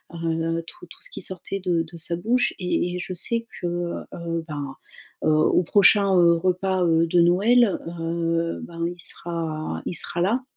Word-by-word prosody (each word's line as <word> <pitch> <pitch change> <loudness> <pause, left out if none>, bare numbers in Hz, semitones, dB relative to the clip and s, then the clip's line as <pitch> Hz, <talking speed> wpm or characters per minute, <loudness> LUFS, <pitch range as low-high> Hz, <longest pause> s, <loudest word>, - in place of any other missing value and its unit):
heu, 165 0 -1
tout 355 0 -12
tout - - -15
ce - - +1
qui - - -6
sortait 190 +1 -3
de 175 -3 0
de 170 +1 -11
sa 170 +1 -1
bouche 240 +7 +1
et 180 0 -1
et - - -3
je 180 - -5
sais 230 +6 +1 0.2
que, - - -3 0.5
heu, 170 -1 -3
ben, 145 -3 -5 0.5
heu, - - +4
au 155 +3 +3
prochain, 200 +1 +5
heu, 170 -1 +6
repas, 185 +2 0
heu, 165 0 +3
de 175 +1 +4
Noël, 200 +6 +4 0.2
heu, 165 0 -1
ben 170 0 -5
il 175 0 -7
sera 165 -2 -4
il 175 - -3
sera 170 - -1
là, 230 +8 +1
170 Hz, 180 wpm, -24 LUFS, 165-190 Hz, 0.5 s, heu